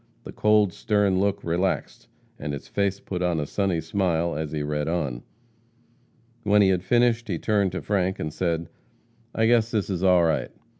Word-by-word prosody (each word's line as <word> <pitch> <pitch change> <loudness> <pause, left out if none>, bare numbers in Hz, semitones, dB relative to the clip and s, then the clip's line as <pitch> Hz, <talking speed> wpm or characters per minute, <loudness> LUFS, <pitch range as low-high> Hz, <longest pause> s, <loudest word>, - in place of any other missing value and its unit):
The - - -8
cold, 105 -3 +3
stern 105 -3 +1
look 100 0 0
relaxed, 85 -7 -2 0.3
and 75 - -4
his 70 - -7
face 100 -1 -1
put 90 -2 -5
on 90 -2 +1
a 75 - -2
sunny 95 +1 -1
smile 85 -1 0
as 75 -1 -4
he 75 -1 -2
read 75 0 -2
on. 75 -8 -2 1.2
When 105 -2 +4
he 95 - +4
had 90 -2 +1
finished, 120 +2 +2
he 90 -5 -2
turned 100 0 +1
to 90 - -4
Frank 95 -2 0
and 75 -1 -4
said, 85 -1 -2 0.7
'I 110 - +2
guess 115 -1 +3
this 105 -3 -1
is 90 -2 -2
all 90 -2 +5
right.' 80 - 0
95 Hz, 185 wpm, -25 LUFS, 80-100 Hz, 1.2 s, all